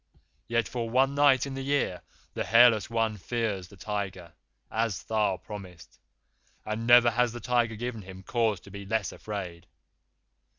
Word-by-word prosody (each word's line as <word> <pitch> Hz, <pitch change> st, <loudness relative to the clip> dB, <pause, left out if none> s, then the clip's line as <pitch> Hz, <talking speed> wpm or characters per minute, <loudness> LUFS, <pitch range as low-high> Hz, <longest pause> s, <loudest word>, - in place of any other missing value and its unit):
Yet 115 Hz, -1 st, +1 dB
for 115 Hz, -2 st, -4 dB
one 135 Hz, +3 st, +3 dB
night 140 Hz, -3 st, +4 dB
in 140 Hz, -, -6 dB
the 135 Hz, -, -4 dB
year 135 Hz, -10 st, 0 dB, 0.3 s
the -, -, -2 dB
Hairless 115 Hz, -3 st, +5 dB
One 115 Hz, -2 st, 0 dB
fears 105 Hz, -3 st, -2 dB
the 100 Hz, -, -16 dB
Tiger, 95 Hz, -4 st, -5 dB, 0.4 s
as 110 Hz, -4 st, -1 dB
Tha 105 Hz, -4 st, 0 dB
promised, 95 Hz, -5 st, -10 dB, 0.7 s
and 110 Hz, +2 st, -3 dB
never 120 Hz, 0 st, +7 dB
has 120 Hz, 0 st, +1 dB
the 120 Hz, -, -6 dB
Tiger 120 Hz, -1 st, +1 dB
given 115 Hz, 0 st, -5 dB
him 95 Hz, 0 st, -11 dB
cause 110 Hz, -3 st, 0 dB
to 100 Hz, -, -14 dB
be 100 Hz, 0 st, -8 dB
less 110 Hz, 0 st, -1 dB
afraid. 90 Hz, -5 st, -7 dB
110 Hz, 160 wpm, -28 LUFS, 100-120 Hz, 0.7 s, never